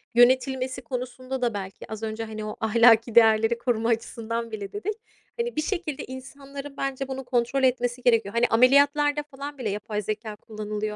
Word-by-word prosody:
yönetilmesi 255 +1 +3
konusunda 255 +1 -5
da 240 -3 +1
belki 195 +1 -7
az 220 0 -6
önce, 220 +1 -3
hani, 215 -1 -6
o 210 - -5
ahlaki 230 0 +5
değerleri 225 0 +5
koruma 235 -1 0
açısından 230 0 -2
bile 205 -2 -6
dedik, 415 +1 -2 0.4
hani, 475 0 -2
bir 305 - +1
şekilde 310 -4 -3
insanların 275 +2 -9
bence 270 0 -2
bunu 265 0 -5
kontrol 245 +2 0
etmesi 245 -1 +1
gerekiyor. 230 -3 +2
Hani, 240 +1 +4
ameliyatlarda 285 +5 +4
falan 285 0 -8
bile 240 -5 -2
yapay 210 +1 -3
zekâ 215 +1 -4
kullanılıyor 210 0 -5
245 Hz, 165 wpm, -25 LUFS, 220-270 Hz, 0.4 s, ahlaki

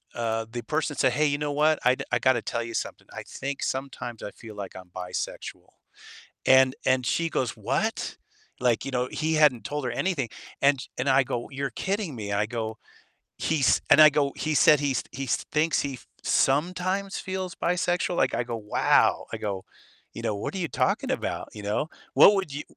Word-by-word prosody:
uh, 115 -1 -1
the 120 0 -4
person 155 +3 -1
said, 130 -2 +2
"Hey, 150 +4 +2
you 145 -1 +1
know 150 0 -1
what? 155 +2 +3
I 125 +1 +5
do - - -5
I - - +2
gotta 130 -3 +3
tell 115 - -2
you 115 0 -7
something. - - -4
I - - -6
think 140 +1 -5
sometimes 130 -3 -4
I 105 - -5
feel 110 -2 -12
like 100 -2 -7
I'm 90 -1 -11
bisexual," 90 0 -5 0.8
and 130 0 +6
and 130 -1 +3
she 170 +6 +1
goes, 125 -5 -1
"What?" - - -2 0.4
Like, 120 -2 +2
you - - -4
know, 125 0 0
he 160 +1 0
hadn't 150 -6 +4
told 145 0 -3
her - - -1
anything, 165 -10 -1 0.3
and 140 -1 +4
sh 135 - -9
and 125 +3 0
I 135 +1 +5
go, 120 -1 -4
"You're 135 0 -3
kidding 195 -5 -2
me?" 105 -2 -5
I 100 +1 +2
go, 110 -1 -4 0.6
"He's" 145 -5 +2
And 155 - +8
I 155 - +10
go, 145 -1 +1
"He 155 - -1
said 150 0 +6
he's 135 -4 0
he's 130 0 -1 0.2
thinks 155 +2 +2
he 140 -2 -3
f 125 - -17 0.2
sometimes 180 +7 +1
feels 185 -1 -4
bisexual?" 175 0 0
Like 130 - +2
I 120 - 0
go, 120 -1 -4
"Wow," 105 -1 +2
I - - -2
go, 100 -3 -4 0.5
you - - -7
know, - - 0
"What 100 - -4
are - - -2
you 170 - -2
talking - - 0
about?" - - -3
You 105 - -9
know? 105 +9 -1 0.3
What 205 - +9
would 190 -8 -2
you 145 +1 -4
135 Hz, 205 wpm, -26 LUFS, 120-155 Hz, 0.8 s, I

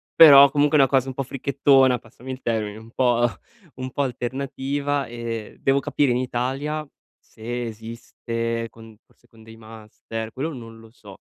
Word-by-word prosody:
però 140 -3 +9
comunque 145 +1 +3
è 140 - +6
una 135 - +4
cosa 135 -1 +2
un 130 - -6
po' 135 - -2
fricchettona, 135 -1 +3
passami 120 +3 -15
il 130 - -7
termine, 110 -2 -2
un 110 +1 -14
po' 120 -1 +2 0.5
un 130 0 -5
po' 140 - -1
alternativa 140 +2 -3
e 115 -2 -6
devo 135 +1 +2
capire 140 -2 0
in 120 - +1
Italia 135 +5 -3 0.3
se 120 +2 -6
esiste, 115 +1 -5
con 115 -1 -15
forse - - -31
con 115 -2 -20
dei 115 0 -13
master, 110 0 -8
quello 155 +5 -4
non 115 -3 -10
lo 115 0 -16
so. 100 -5 -14
125 Hz, 170 wpm, -23 LUFS, 115-140 Hz, 0.5 s, però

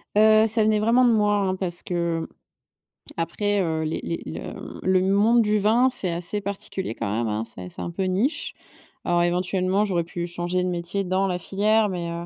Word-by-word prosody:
Heu, 215 +1 +6
ça 220 0 +2
venait 215 0 +3
vraiment 235 +4 +4
de 240 - +5
moi 210 -1 +3
hein, 190 -2 0
parce 180 -2 -3
que, 170 -2 -2 0.9
après, 200 +5 0
heu, 160 -2 -1
les 155 - -2
les 165 - -3
le 80 - -6 0.3
le 185 0 +3
monde 225 +4 +4
du 210 -1 +2
vin, 225 +5 +3
c'est 195 -8 -1
assez 175 +5 -2
particulier 195 - -4
quand 100 - -4
même 115 +1 -1
hein? 110 +1 -1
C'est 90 -5 -9
c'est - - -8
un - - -4
peu 190 +3 -3
niche. 195 - -1 0.5
Alors 175 0 +2
éventuellement 185 +3 +1
j'aurais 175 -4 0
pu 175 +1 -5
changer 175 +1 -2
de 180 - -1
métier 180 +3 -2
dans 185 +1 0
la 180 -2 -1
filière 210 +2 +2
mais, 170 -2 -4
heu, 170 0 -5
185 Hz, 200 wpm, -24 LUFS, 170-210 Hz, 0.9 s, Heu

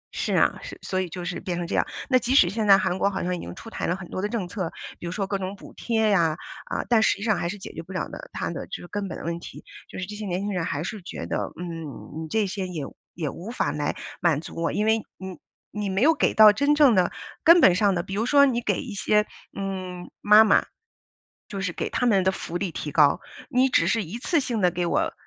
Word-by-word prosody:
是 - - -1
啊， - - +3
是， - - -8
所 185 0 -1
以 180 - -4
就 175 +1 -6
是 180 0 -3
变 175 -2 -3
成 175 - -2
这 - - -5
样。 - - +3 0.2
那 255 -2 +4
即 255 +2 0
使 180 - +7
现 215 +1 -2
在 195 -1 +8
韩 185 -1 -1
国 200 - +3
好 190 -2 -3
像 180 0 -1
已 - - -6
经 - - -8
出 225 - -10
台 - - -3
了 175 - +1
很 185 -2 -9
多 185 - -4
的 205 - -1
政 215 -6 -2
策， 180 -3 -4 0.3
比 175 - -6
如 - - -3
说 195 +1 -2
各 195 0 -2
种 190 +1 -4
补 - - -13
贴 220 -2 0
呀， 165 -4 +2 0.3
啊， - - -2
但 230 -3 +4
实 220 - +3
际 205 - -7
上 215 -3 +2
还 170 0 -1
是 205 - -5
解 190 - -9
决 - - -6
不 175 - -13
了 185 - -2
的 - - -9
它 - - -3
的 - - -6
这 - - -6
个 - - -9
根 205 0 -3
本 - - -6
的 - - -8
问 170 0 -2
题， - - -11 0.2
就 - - -9
是 185 - -3
这 210 - -8
些 210 -1 -5
年 180 +1 -2
轻 205 +1 -2
人 170 -3 -1
还 145 +2 -2
是 205 +2 -5
觉 - - -7
得， - - -2
嗯， 165 -2 -7
你 - - -6
这 215 +2 +1
些 190 -1 -3
也 165 -6 -5 0.3
也 160 -3 -3
无 185 +10 -8
法 245 - -1
来 145 -1 -2 0.3
满 165 -5 +3
足 160 - -10
我， 165 - +1
因 210 - 0
为 220 0 +3 0.2
你 190 -1 -8 0.3
你 210 -1 -3
没 195 +4 +1
有 320 +3 +6
给 - - +1
到 215 -1 +9
真 285 +6 +2
正 290 -5 +6
的 185 -2 +3 0.3
根 335 +2 +8
本 195 - +7
上 200 0 +2
的 175 - -1
比 190 - -8
如 215 +3 0
说 280 0 +6
你 240 -3 +1
给 - - 0
一 245 -7 -7
些， 210 +1 +2 0.3
嗯 185 -2 -5
妈 210 +1 +8
妈， - - +4 0.9
就 200 -2 -5
是 185 -3 -2
给 - - -3
她 245 - 0
们 200 -5 +4
的 190 - +3
福 175 -2 -5
利 190 -2 -2
提 150 -2 -5
高， 150 +2 +5 0.3
你 255 +2 +3
只 - - +3
是 225 -4 +1
一 200 +9 -6
次 335 +3 +1
性 240 -5 -1
地 180 -1 +4
给 175 0 -2
我 - - +1
195 Hz, 300 characters per minute, -25 LUFS, 175-220 Hz, 0.9 s, 到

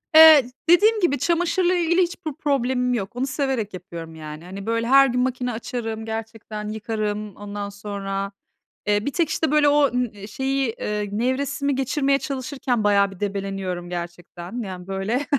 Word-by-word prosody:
Eee, 315 -5 +9 0.2
dediğim 425 +6 +6
gibi 335 -8 +2
çamaşırla 350 +3 +2
ilgili 345 +1 +3
hiçbir 345 -3 -2
problemim 255 -3 0
yok, 205 -2 -3
onu 255 +2 -1
severek 265 -6 -1
yapıyorum, 170 -3 -8
yani. 155 +1 -8
Hani, 195 +2 -8
böyle, 230 +1 0
her 275 +2 +7
gün 250 0 0
makine 250 -1 -1
açarım, 225 -1 -4
gerçekten 220 -1 -5
yıkarım, 215 -1 -3
ondan 205 0 -6
sonra, 200 -1 -4 0.6
eee, 205 +1 +2
bir 285 - -1
tek 340 -3 +1
işte 315 -1 0
böyle 300 -1 +5
o 290 -1 +4
ı 215 -5 -2
şeyi, 265 +3 -1
eee, 210 -1 -2
nevresimi 270 +5 0
geçirmeye 270 +1 +1
çalışırken 260 -4 -2
bayağı 200 -1 +4
bir 190 - -13
debeleniyorum 195 -3 -3
gerçekten. 175 +4 -6
Yani, 185 -2 -7
böyle 195 +8 -1
230 Hz, 155 wpm, -23 LUFS, 200-275 Hz, 0.6 s, Eee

